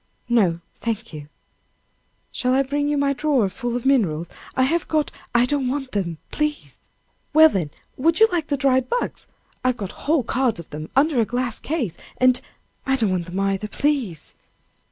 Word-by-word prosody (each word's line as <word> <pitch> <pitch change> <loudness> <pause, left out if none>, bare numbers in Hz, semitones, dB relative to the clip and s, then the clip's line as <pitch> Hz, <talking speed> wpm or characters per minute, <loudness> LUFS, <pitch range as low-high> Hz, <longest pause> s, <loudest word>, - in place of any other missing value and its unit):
"No, 185 -8 +3 0.2
thank 230 -2 -3
you." 150 -1 -8 1.0
"Shall 255 0 +1
I 270 - +4
bring 290 +2 -1
you 295 0 +1
my 280 0 +2
drawer 275 -7 +2
full 240 +3 -4
of 245 - -3
minerals? 175 - +2 0.3
I 260 - +4
have 330 +6 +1
got 305 -2 0
" - - -27
"I 240 +1 +5
don't 275 0 0
want 270 0 -2
them, 175 -5 -2
please." 300 0 -2 0.5
"Well, 315 +1 +8
then, 175 - -1 0.3
would 325 +7 +2
you 445 - +8
like 335 -3 -1
the 285 - 0
dried 260 -2 +2
bugs? - - -2 0.4
I've 255 -1 +1
got 200 -4 -5 0.2
whole 310 -4 +4
cards 245 -3 0
of 170 - -10
them 155 +1 -6
under 285 -1 +3
a - - +2
glass 245 0 -2
case, 275 - -2 0.2
and 255 -1 +4 0.2
" - - -41
"I 270 - +3
don't 220 -7 +1
want 180 -2 -1
them 180 +2 -4
either, 195 +1 0
please." 250 - -1
255 Hz, 190 wpm, -23 LUFS, 200-285 Hz, 1.0 s, Well